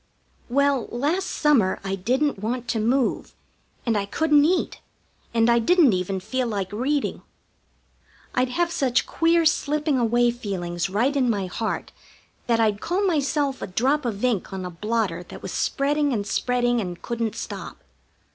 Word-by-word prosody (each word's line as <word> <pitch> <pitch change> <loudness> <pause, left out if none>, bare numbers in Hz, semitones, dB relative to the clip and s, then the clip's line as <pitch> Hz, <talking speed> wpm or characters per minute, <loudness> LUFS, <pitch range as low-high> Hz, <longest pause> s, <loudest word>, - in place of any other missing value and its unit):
Well, 275 -1 +2
last 310 +10 -1
summer 255 -12 +2
I 195 0 -3
didn't 250 +7 0
want 240 +4 -3
to 225 - 0
move, 245 +3 0 0.5
and 230 -3 +1
I 200 -1 -1
couldn't 300 +5 +3
eat, 360 +3 0 0.5
and 230 -1 +3
I 235 0 +4
didn't 300 - +4
even 185 +1 -1
feel 255 +6 -2
like 200 -4 -3
reading. 270 +7 -1 1.1
I'd 250 0 +1
have 340 +7 0
such 260 -6 +1
queer 330 0 +2
slipping 300 -2 +1
away 240 +1 +3
feelings 185 -6 -3
right 240 +9 +1
in 260 -3 +2
my 200 -4 0
heart 220 +5 -3 0.6
that 230 -1 +2
I'd 215 -2 +1
call 370 +4 0
myself 290 -5 0
a - - -3
drop 265 +10 +1
of 230 -1 -2
ink 225 -7 0
on 190 -1 -5
a 180 - -5
blotter 210 -1 -1
that - - -11
was - - -5
spreading 290 0 0
and 205 -3 -1
spreading 245 +2 +1
and 180 -3 -5
couldn't 230 -2 -2
stop. - - -7
240 Hz, 160 wpm, -24 LUFS, 210-285 Hz, 1.1 s, I